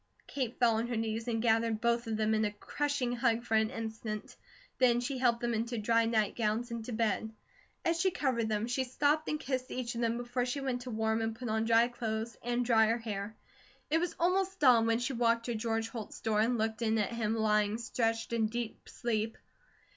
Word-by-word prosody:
Kate 255 -4 -3
fell 230 -3 +3
on 230 +2 -1
her 240 - -2
knees 225 +1 -2
and 225 -1 -1
gathered 225 -1 +2
both 235 0 +1
of 220 -1 -1
them 220 0 +1
in 215 0 +2
a 210 - 0
crushing 280 +4 -2
hug 235 -1 +1
for 235 - -4
an 220 0 +3
instant; 220 -1 -5 0.4
then 245 -2 +4
she 255 +2 -3
helped 240 -2 +2
them 240 0 0
into 230 +2 -1
to 220 - -2
dry 230 +1 +3
nightgowns 220 +1 0
and 230 -1 -4
to 250 - -5
bed. 220 -1 0 0.5
As 335 0 +2
she 380 - +4
covered 255 -10 0
them 210 0 0
she 250 +2 0
stooped 290 +4 +1
and 305 - -1
kissed 260 -3 -3
each 250 -2 -3
of 235 - -3
them 230 0 +1
before 245 +1 -2
she 250 +3 -2
went 260 -3 -2
to 250 - -7
warm 220 0 0
and 225 0 -2
put 245 0 -5
on 220 +1 +1
dry 230 +1 +5
clothes, 225 -2 -3
and 245 +1 -1
dry 225 -2 +5
her 230 +2 +2
hair. 215 -2 -5 0.6
It 325 - +4
was 350 0 -2
almost 380 +2 +1
dawn 240 -5 +6
when 230 0 +3
she 245 +3 -2
walked 230 -1 +2
to 240 - -1
George 225 0 -1
Holt's 225 -3 -7
door 215 -1 +1
and 235 +2 +2
looked 220 +1 -1
in 225 -1 +2
at 210 0 0
him 225 -1 0
lying 210 -1 +2
stretched 230 -1 -1
in 225 -2 +2
deep 235 0 -5
sleep. 225 -2 -2
230 Hz, 220 wpm, -32 LUFS, 220-245 Hz, 0.6 s, dawn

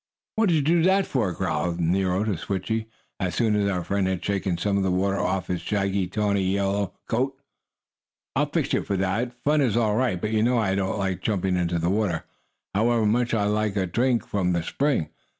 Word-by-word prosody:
"What 220 -2 +3
did 170 - +3
you 155 - +3
do 165 +3 +3
that 190 +3 +3
for?" 115 -9 0
growled 85 -1 -2
Nero 90 +3 +1
to 110 - 0
Switchie, 100 +6 -3 0.3
as 90 -3 -2
soon 110 -3 +2
as 100 -1 +2
our 90 -3 -1
friend 100 +1 0
had 95 -2 -2
shaken 95 -3 -1
some 100 +3 0
of - - +1
the 95 - +1
water 95 +2 +1
off 95 -2 0
his 90 -2 -3
shaggy, 100 -1 0
tawny 100 +1 0
yellow 100 +1 0
coat. 135 +4 -1 1.0
"I'll - - +1
fix - - -1
you - - +2
for 100 - -2
that! 95 +6 0
Fun 150 +1 +3
is 120 -5 +2
all 110 -3 +2
right, 120 -6 +1
but 105 +4 -2
you 110 -1 +2
know 120 +2 +3
I 100 -4 +1
don't 95 +1 -1
like 95 -2 -2
jumping 95 -3 0
into 85 -1 0
the 85 +2 0
water, 100 -6 0 0.5
however 115 +2 +2
much 115 +2 +2
I 105 - +1
like 105 0 0
a 95 -2 +1
drink 120 +6 +1
from 90 -3 0
the 85 -1 0
spring. 135 - 0
100 Hz, 215 wpm, -25 LUFS, 95-115 Hz, 1.0 s, What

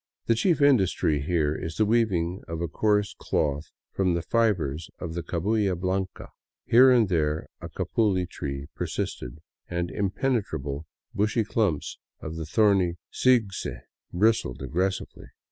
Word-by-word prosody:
The 115 - +3
chief 150 +5 +2
industry 95 - +3
here 75 -1 +1
is 80 +1 -5
the 110 - +2
weaving 95 -6 +1
of 85 -1 -4
a 85 - -1
coarse 105 +4 +1
cloth 75 0 -1 0.3
from 95 -3 +1
the 85 - -2
fibers 85 -10 0
of 85 -3 -6
the 85 - -3
cabuya 95 +3 0
blanca. 95 +1 -3 0.4
Here 130 +3 +7
and 120 -4 +5
there 80 -4 0 0.2
a - - -7
capuli 100 -5 0
tree 70 -4 -5
persisted, - - -4 0.3
and 85 0 -2
impenetrable, 95 - -2 0.3
bushy 110 +3 +1
clumps 100 -8 -1 0.2
of 80 +1 -6
the 80 -1 -5
thorny 95 -2 +3 0.2
sigse 115 -7 +1 0.3
bristled 105 - +1
aggressively. 95 +3 -2
95 Hz, 135 wpm, -26 LUFS, 80-110 Hz, 0.4 s, Here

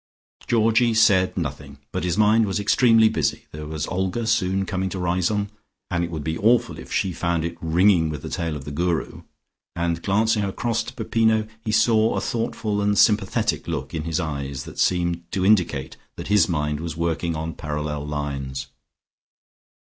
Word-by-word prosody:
Georgie 115 0 +3
said 100 -5 +4
nothing, 70 -3 -5
but - - -3
his 90 +1 -1
mind 110 +1 +4
was 95 +2 -1
extremely 115 +2 +5
busy. - - -1
There 75 0 -7
was 80 0 -3
Olga 95 +5 -2
soon 95 -4 +1
coming 95 -1 -2
to 95 - -5
Riseholme, 90 +3 0 0.4
and 85 -1 0
it 85 - -3
would 80 -3 -5
be 80 +1 -3
awful 115 +3 +2
if - - -11
she 95 - 0
found 85 -1 -1
it 85 - -4
ringing 85 0 +3
with 75 -3 -6
the - - -5
tale 85 -2 -2
of 70 -2 -7
the 75 - -6
Guru, 85 +2 -2 0.5
and 85 -1 -1
glancing 105 +3 +1
across 115 +4 -1
to 125 - -8
Peppino, 110 -1 +1 0.2
he 110 - -2
saw 110 +1 +3
a - - +1
thoughtful 110 -3 -2
and 105 0 +1
sympathetic 105 -6 +2
look 70 -6 -4
in 80 -1 -3
his 80 -2 -1
eyes, 70 -4 -4
that - - -10
seemed 85 -1 +1
to 95 -1 0
indicate 85 -10 +2 0.2
that - - -7
his 105 -5 +4
mind 75 -3 -1
was 80 -1 -5
working 85 0 -1
on 80 +1 -4
parallel 75 -1 -4
lines. 70 -2 -4
90 Hz, 175 wpm, -23 LUFS, 80-105 Hz, 0.5 s, extremely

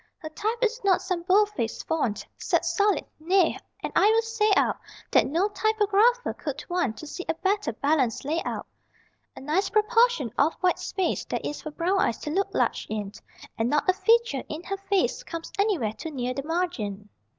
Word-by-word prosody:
Her 315 - -8
type 430 +9 -2
is 475 +1 0
not 380 -3 +3
some 365 -3 -2
=bold 400 +4 +4
face= 230 - -3
font, 280 -10 -1
Set - - +1
solid. 410 -1 +2
Nay! 355 +2 +3 0.3
And - - -4
I 405 - +5
will 450 +1 +3
say 450 -2 +1
out - - +2 0.3
That - - +4
no 335 +8 +1
typographer 435 +3 +2
could 290 -2 -5
want 315 -12 -1
To 310 - -8
see 360 +4 -6
a 325 - +1
better 385 - 0
balanced 270 0 0
layout. 315 +4 -2 0.7
A - - -10
nice 310 +8 0
proportion 435 - +3
of 300 +4 +4
white 365 -1 +1
space 380 -2 -1
There - - -2
is 295 - -4
for 310 - -6
brown 350 +6 0
eyes 230 - +1
to 300 - -4
look 390 +5 0
large - - 0
in, 210 -2 -3 0.5
And 225 +2 +1
not 295 +5 +1
a 370 - +5
feature 400 - +2
in 315 +3 -5
her 390 +1 -3
face 395 +4 0
Comes 335 -9 -7
anywhere 365 - +1
too 320 - -7
near 255 -4 -3
the 275 +2 -5
margin. 235 - -2
360 Hz, 190 wpm, -26 LUFS, 290-415 Hz, 0.7 s, I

